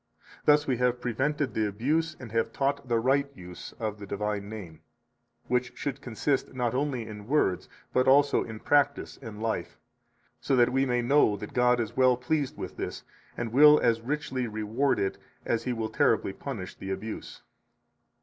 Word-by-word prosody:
Thus 150 0 +5
we 130 -3 0
have 125 0 +1
prevented 135 +2 -1
the 110 -1 +1
abuse 155 +10 -1
and 120 -4 -9
have 115 0 0
taught 140 +1 -1
the 120 -1 +2
right 135 +4 +2
use 90 -3 -9
of 105 -2 -4
the 100 - -8
divine 100 0 -3
name, 95 -8 -9 0.7
which 125 0 -1
should 140 - -4
consist 130 +3 -1
not 120 -2 0
only 130 -3 -1
in 105 -1 -9
words, 120 -10 +1 0.2
but 130 - +3
also 140 +2 +5
in 110 -1 -8
practise 145 -1 +1
and 110 -4 -8
life, 115 -1 -2 0.6
so 135 - +1
that 120 -1 +4
we 135 +1 +2
may 125 -1 +1
know 120 -5 +4
that 105 +1 -8
God 125 0 +3
is 115 0 -3
well 130 -1 +4
pleased 140 +2 -1
with - - -7
this, - - -5 0.3
and 115 -1 -3
will 150 +3 +8
as 115 -1 +2
richly 130 -1 -2
reward 110 +6 0
it 95 - -1 0.3
as 115 0 -1
He 125 - 0
will 115 -2 -2
terribly 95 - +2
punish 110 -9 -6
the 95 - -8
abuse. 100 +3 -6
125 Hz, 180 wpm, -28 LUFS, 110-135 Hz, 0.7 s, will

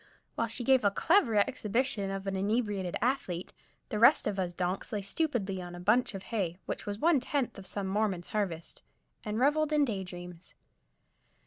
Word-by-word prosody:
While 230 - -1
she 235 +2 -1
gave 260 0 +4
a 200 - +5
clever 265 - +3
exhibition 210 +1 +1
of 195 0 -4
an 195 -1 -2
inebriated 200 -2 -1
athlete, 210 -9 -1 0.4
the 210 - -2
rest 240 +7 +6
of 200 -2 -1
us 175 -2 -2
donks 180 +2 -2
lay 205 -3 -2
stupidly 200 - -1
on 175 0 -8
a - - -8
bunch 215 +4 +2
of 190 - -6
hay, 180 -6 -1
which - - -5
was 205 0 -3
one 320 +4 +4
tenth 260 -3 -2
of 190 - -9
some 200 -1 -3
Mormon's 190 -3 0
harvest, 185 -7 -3 0.4
and 210 -1 -3
reveled 295 +4 +2
in 300 -1 +4
day 200 -6 -3
dreams. 175 -1 -10
205 Hz, 185 wpm, -30 LUFS, 190-245 Hz, 0.4 s, rest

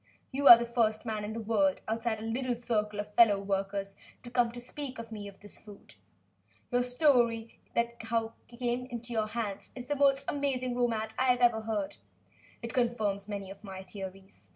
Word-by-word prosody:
You 280 +1 +1
are 235 - +13
the 235 - -2
first 230 -2 +1
man 215 -2 -2
in 210 +1 -4
the 230 - -4
world, 205 -4 +1
outside 225 0 -1
a - - -7
little 245 +2 -1
circle 215 -3 -1
of 210 0 -5
fellow 215 -3 +6
workers, 195 0 -2 0.3
to 240 -1 0
speak 260 +2 -6
to 230 -1 -8
me 205 -2 -6
of 200 -1 -12
this 205 - -8
perfect - - -24 0.3
food. - - -15 0.8
Your 245 - +3
story 245 -3 +2 0.2
as 235 - +4
to - - -8
how 225 0 0 0.2
it 235 - -13
came 245 +1 -1
into 240 -1 -6
your 220 -1 +1
hands 215 -3 -4
is 250 -1 -7
the 290 - -1
most 275 -1 +3
amazing 260 -3 -1
romance 225 -3 0
I 260 - +3
have 250 -1 +3
ever 235 -2 +4
heard. 210 - -3 0.7
It 230 - -5
confirms 220 -5 0
many 200 -2 -5
of 195 - -12
my 190 -2 -7
theories. 190 - -10
230 Hz, 200 wpm, -30 LUFS, 205-245 Hz, 0.8 s, are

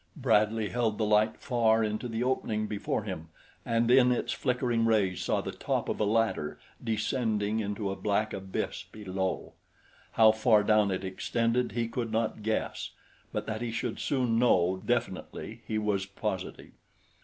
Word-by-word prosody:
Bradley 110 -5 +2
held 115 -3 0
the 110 - +1
light 105 +1 +3
far 115 -4 +2
into 110 +3 -2
the 115 0 -2
opening 110 -4 0
before 105 0 -2
him 90 -6 -6 0.3
and 115 +1 +1
in 125 -1 +6
its 125 - 0
flickering 125 -2 0
rays 105 -5 +2
saw - - 0
the - - -5
top - - -2
of - - -2
a - - +2
ladder 110 -8 0 0.2
descending 110 -1 0
into 105 -1 -2
a - - -3
black 105 +2 0
abyss 95 -1 -4
below. 95 -3 -3 0.6
How 110 -1 +7
far 110 -1 +4
down 105 -1 +4
it 95 0 -2
extended 115 +4 0
he 120 0 0
could 115 -1 -3
not 110 -1 -1
guess; 110 +1 -2 0.4
but - - -3
that 110 +1 -4
he 120 - -2
should 115 0 -3
soon 125 -5 +1
know 95 -6 +3
definitely 115 -1 -3
he 110 - -1
was 105 -3 0
positive. 100 - -5
110 Hz, 160 wpm, -29 LUFS, 105-115 Hz, 0.6 s, How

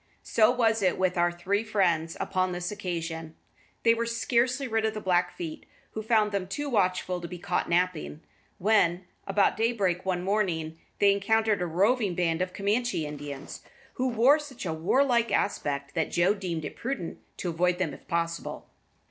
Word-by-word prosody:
So 215 -1 +4
was 230 -3 +2
it 185 -2 +2
with 185 -1 +1
our 175 0 +2
three 190 +5 -1
friends 175 -7 +1
upon 185 -1 0
this 175 +1 -3
occasion. 165 -5 -4 0.5
They 230 - +6
were 230 0 -1
scarcely 245 +3 +1
rid 225 -2 0
of 220 0 0
the - - -2
Blackfeet, 215 - -1 0.2
who 220 - -4
found 215 -1 +2
them 195 -2 -2
too 285 +9 -4
watchful 185 -4 +1
to 170 - -5
be 180 - -7
caught 175 +1 -2
napping, 170 -3 0 0.4
when, 185 -3 +2 0.2
about 195 +1 +2
daybreak 205 -6 +1
one 180 -2 -1
morning, 170 -6 -1 0.2
they 200 -1 +5
encountered 215 0 +2
a 180 - 0
roving 200 +3 +2
band 165 -1 0
of 185 0 -1
Camanchee 205 -3 0
Indians, 145 -1 -7 0.3
who 260 0 -1
wore 255 +5 +5
such 270 -7 -8
a 165 - -1
warlike 235 - +2
aspect 140 -7 -1
that 160 -2 0
Joe 175 +4 +3
deemed 175 -6 -4
it - - -6
prudent 235 -10 -4 0.2
to 180 - -3
avoid 180 +2 +1
them 170 -6 -1
if - - -13
possible. 170 -1 -3
185 Hz, 175 wpm, -28 LUFS, 175-225 Hz, 0.5 s, They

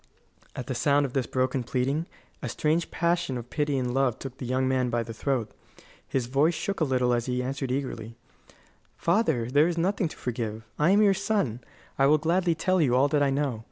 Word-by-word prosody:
At 125 - -5
the 130 - -3
sound 140 +3 +2
of 130 - -6
this 135 -3 0
broken 130 0 0
pleading 135 +7 -1 0.3
a - - -3
strange 160 +2 0
passion 170 -5 0
of 120 0 -9
pity 145 -2 0
and 125 -1 -1
love 135 -3 +1
took 135 -1 -8
the 125 - -5
young 130 +1 +1
man 130 -1 +1
by 120 0 0
the 115 - -7
throat. 125 -1 -1 0.6
His 130 -3 -1
voice 140 +7 +2
shook 200 +3 -3
a - - +2
little 125 -2 +1
as 120 0 -1
he 125 0 -1
answered 135 0 -3
eagerly: 120 -4 -4 0.8
"Father, 165 - +1
there 145 +4 +5
is 175 -1 -2
nothing 185 +1 +1
to - - -11
forgive. 115 -3 -4 0.2
I 150 +3 +4
am 205 +3 +5
your 200 -1 +5
son; 195 - -1 0.4
I 135 - +5
will 150 +2 +5
gladly 170 +2 +1
tell 185 +2 +1
you 125 -5 +3
all 135 +3 +4
that 145 0 +2
I 140 - +3
know. 135 -4 -1
135 Hz, 215 wpm, -27 LUFS, 125-160 Hz, 0.8 s, there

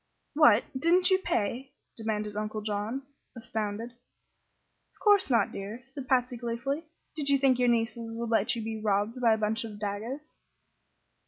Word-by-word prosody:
"What! 270 -8 +6
didn't 355 +7 +4
you 375 - +5
pay?" 260 - -2 0.2
demanded 215 -2 -3
Uncle 215 0 -3
John, 210 +5 -3 0.3
astounded. 220 0 -4
"Of 245 +1 -39
course 410 -6 +4
not, 235 -3 +3
dear," 210 +5 -7
said 270 +1 -8
Patsy, 250 -1 +1
gleefully. 245 +7 -3 0.3
"Did 290 -3 -1
you 280 - +5
think 265 -2 +3
your 245 -1 +4
nieces 230 0 0
would 230 0 -4
let 225 +2 +2
you 230 - -4
be 220 0 -4
robbed 210 +4 0
by 230 -2 +5
a - - +1
bunch 220 +1 0
of 215 -2 -7
dagoes?" 220 +9 -5
235 Hz, 160 wpm, -29 LUFS, 215-265 Hz, 0.3 s, What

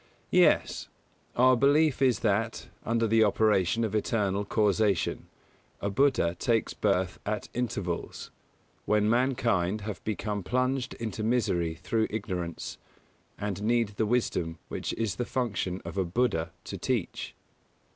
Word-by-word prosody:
Yes; - - +3 0.5
our 130 +1 +6
belief 145 +3 +3
is 130 -3 +3
that, 110 +1 0
under 115 0 +1
the 110 0 +4
operation 105 0 +2
of 110 - -1
eternal 105 -2 0
causation, 105 -2 +1 0.5
a 100 - -2
Buddha 100 -8 +2
takes 115 -2 +1
birth 95 -3 0
at 105 +1 -3
intervals, 100 -8 -3 0.5
when 105 0 +2
mankind 115 -5 +1
have 105 0 -6
become 105 -1 -2
plunged 125 +5 -1
into 110 -1 -4
misery 90 -8 +1
through 95 +6 0
ignorance, 90 -6 -4 0.6
and 100 -1 -3
need 115 0 +2
the 105 +1 -1
wisdom 90 -8 0
which - - -3
it - - -7
is 105 -4 -1
the - - 0
function 105 -7 -2
of 100 - -4
a - - +3
Buddha 85 -3 0
to - - -7
teach. - - -2
110 Hz, 135 wpm, -28 LUFS, 95-120 Hz, 0.6 s, our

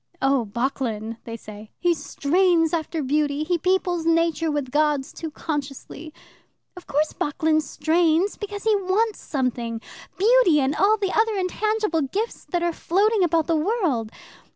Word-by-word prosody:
'Oh, 270 -3 +2
Bocklin,' 230 -2 -2
they 230 0 -6
say; 215 -1 -11
'he 350 -1 +2
strains 335 +2 +1
after 320 -1 -2
beauty, 290 +1 0
he 345 +2 0
peoples 360 -1 0
Nature 330 0 +1
with 290 -4 -2
gods 295 -1 +1
too 325 - -6
consciously.' 295 0 -6 0.6
Of 360 - -12
course 300 +2 0
Bocklin 310 +1 0
strains, 325 +5 +1
because 410 -1 -6
he 440 -1 +3
wants 405 +3 0
something 240 -4 -2 0.4
beauty 405 -6 +5
and 275 +1 0
all 425 +2 +3
the 395 -3 -1
other 440 0 +2
intangible 410 -1 0
gifts 395 - -3
that 350 -1 -2
are 345 -1 0
floating 405 +5 +2
about 330 -2 +2
the 330 - +1
world. 310 - 0
325 Hz, 150 wpm, -23 LUFS, 285-375 Hz, 0.6 s, beauty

